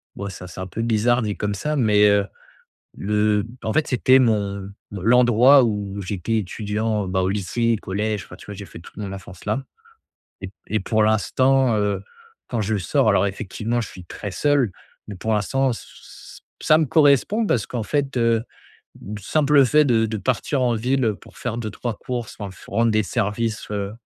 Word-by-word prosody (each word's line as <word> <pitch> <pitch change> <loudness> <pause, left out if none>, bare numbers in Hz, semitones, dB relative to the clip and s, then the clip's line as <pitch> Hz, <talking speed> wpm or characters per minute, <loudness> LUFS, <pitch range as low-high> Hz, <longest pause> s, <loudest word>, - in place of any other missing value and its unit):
bon 100 0 -5
ça 90 -1 -9
c'est 90 - -10
un 95 - -4
peu 110 +5 -5
bizarre 115 +2 +2
dit 105 -2 -2
comme 105 -1 -2
ça, 150 +10 -2
mais 105 -4 +4
heu, 100 -1 +3 0.7
le 105 +1 +1 0.2
en 110 - -1
fait 155 - +1
c'était 130 +1 +4
mon 100 -4 0 0.2
l'endroit 120 +6 +5
où 100 -3 -2
j'étais 100 +4 -2
étudiant, 105 +1 -2
bah 95 0 0
au 95 - +1
lycée, 110 +4 0
collège. 105 +1 -2
Enfin - - -12
tu - - -14
vois 105 - -7
j'ai 100 +1 -8
fait - - -12
toute 85 - -15
mon 100 -2 -5
enfance 95 -1 -10
là 130 +6 -1 0.8
et 95 - -5 0.2
et 110 - 0
pour 110 +2 +1
l'instant, 130 +4 +2
heu, 100 -2 -1 0.4
quand 120 -3 -2
je 105 +1 0
sors, 90 - +1
alors 100 +2 +3
effectivement 110 +3 -3
je 110 - -6
suis 90 -2 -12
très 100 +4 -7
seul, 140 -2 +2 0.4
mais 100 - -7
pour 110 +4 -2
l'instant, 135 +6 +1
ç 115 - -5
ç - - -14 0.2
ça 155 - +5
me 160 - +2
correspond 150 - +3
parce 120 - +1
qu'en 120 -3 -3
fait, 140 +1 -1
heu, 115 -1 +2 0.8
simple 145 +4 +3
fait 150 +5 +4
de 115 -4 +3
de 110 0 -3
partir 130 +5 -1
en 120 -2 +2
ville, 125 +4 0
heu, 110 -2 +1
pour - - -18
faire 120 -1 -3
2-3 110 0 -4
courses 120 -3 -5
quand 100 - -6
il 95 - -10
faut - - -14
rendre 115 0 +3
des 110 0 +3
services, 110 0 -2
heu, 100 -1 -3
110 Hz, 195 wpm, -22 LUFS, 100-125 Hz, 0.8 s, l'endroit